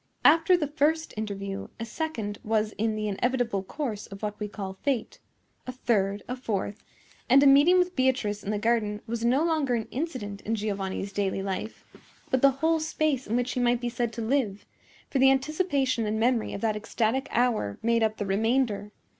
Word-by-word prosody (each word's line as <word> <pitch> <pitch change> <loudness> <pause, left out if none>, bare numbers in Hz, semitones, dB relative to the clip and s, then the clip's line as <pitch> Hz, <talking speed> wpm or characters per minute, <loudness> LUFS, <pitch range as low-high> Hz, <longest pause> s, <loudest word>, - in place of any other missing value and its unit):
After 325 +4 +6
the 315 - 0
first 310 +2 0
interview, 200 -2 -4
a 230 - -3
second 230 -7 -4
was 215 0 +1
in 220 +1 -1
the 215 0 -2
inevitable 235 0 0
course 215 0 -5
of 195 +1 -11
what 210 0 -3
we 210 - -2
call 195 -2 -7
fate. 265 -6 -1 0.5
A - - -2
third; 205 -5 0
a 250 - -3
fourth; 210 -4 -3 0.5
and 270 +3 +7
a - - +5
meeting 285 +6 +7
with 360 0 +1
Beatrice 255 -6 +1
in 200 - -5
the 210 - 0
garden 210 -1 0
was 230 0 -4
no 255 +6 +3
longer 310 -7 +1
an 225 -2 -3
incident 250 -9 -4
in 225 - -1
Giovanni's 200 -2 -3
daily 195 -1 -1
life, 195 +3 -5 0.5
but 260 -2 +2
the 275 - +7
whole 320 +5 +1
space 310 -4 -1
in 225 - -1
which 245 +1 0
he - - -2
might 245 -1 +2
be 240 0 -2
said 240 -1 -2
to 230 +1 -4
live; 220 -5 0 0.5
for 270 - +1
the 265 +1 +7
anticipation 270 - +1
and 215 +1 -1
memory 235 0 +1
of 200 - -6
that 220 -2 +1
ecstatic 225 +4 -1
hour 230 - +1
made 230 0 +2
up 220 -1 +1
the 205 - -2
remainder. 210 +1 0
230 Hz, 195 wpm, -27 LUFS, 210-270 Hz, 0.5 s, and